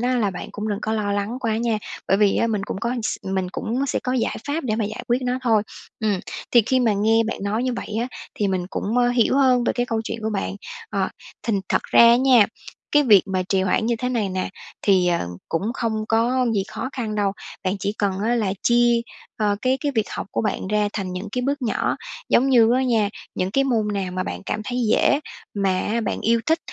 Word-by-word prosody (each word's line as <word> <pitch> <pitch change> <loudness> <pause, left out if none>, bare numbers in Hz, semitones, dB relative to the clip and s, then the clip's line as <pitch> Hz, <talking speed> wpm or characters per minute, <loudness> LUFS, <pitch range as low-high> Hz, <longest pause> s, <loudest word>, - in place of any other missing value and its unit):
á 250 +1 +1
là 205 -4 +1
bạn 180 - -7
cũng 210 +1 -4
đừng 205 -1 -1
có 220 - -1
lo 205 -2 0
lắng 205 +5 -2
quá 220 -1 0
nha, 230 -2 0 0.3
bởi 195 - +4
vì 205 -1 +3
á 230 - +2
mình 210 -3 -1
cũng 190 - -4
có 235 +1 -1
s - - -1
mình 190 -1 -2
cũng 250 +5 -2
sẽ - - 0
có 255 - -1
giải 250 -3 0
pháp 295 +1 -2
để 215 -3 0
mà 220 - 0
giải 215 +1 -5
quyết 240 +1 +3
nó 250 0 0
thôi. 220 -4 +3 0.4
Ừm, 210 -4 +1 0.3
thì 240 -2 +6
khi 260 0 +3
mà 225 -3 +3
nghe 220 +3 +3
bạn 230 - -3
nói 215 +4 -1
như 255 - 0
vậy 215 - -5
á 245 - -2 0.3
thì 205 -2 0
mình 185 -2 -1
cũng, 220 +4 -2
ơ, 245 0 +4
hiểu 245 +2 +2
hơn 255 -3 +4
về - - +2
cái 245 0 -1
câu 225 -2 -1
chuyện 230 - -4
của 220 - -1
bạn, 200 -1 -2 0.3
ờ, - - 0 0.3
thành 205 -4 0
thật - - +1
ra - - +4
á 235 +1 +7
nha, 255 -5 +5 0.5
cái 295 0 +6
việc 210 -8 +6
mà 185 -1 0
trì 190 -1 +2
hoãn 205 +4 +1
như 235 -1 +1
thế 250 +2 -2
này 230 -5 0
nè, 185 0 -2 0.3
thì, 185 -3 +4
ờ, 170 - 0 0.2
cũng 165 - -1
không 220 -3 -1
có 240 +3 +2
gì 195 - +2
khó - - -4
khăn 225 -5 -3
đâu, 205 -2 +1 0.3
bạn 185 +2 0
chỉ 200 +2 -1
cần 200 -2 +1
á 240 +2 +2
là 210 -5 0
chia, 240 0 +4 0.4
ờ, 205 -2 +1
cái 260 +1 +2
cái 290 -2 -1
việc 220 -2 0
học - - -4
của - - -1
bạn 205 -2 -2
ra 210 0 +1
thành 190 -3 -3
những 190 +3 -5
cái 250 - -1
bước 280 +1 -1
nhỏ, 230 - 0 0.3
giống 265 +3 +4
như 235 -2 +6
á 260 - +2
nha, 230 -5 +2 0.3
những 185 +1 -1
cái 275 +6 +2
môn 230 -5 +1
nào 190 -2 -2
mà 185 0 -1
bạn 90 - -5
cảm 215 - -2
thấy 245 +3 -3
dễ 285 - +3 0.3
mà 195 -1 +1
á 230 +3 -1
bạn 220 - -2
yêu 230 +1 +2
thích 320 +1 +3
220 Hz, 250 wpm, -22 LUFS, 200-245 Hz, 0.5 s, á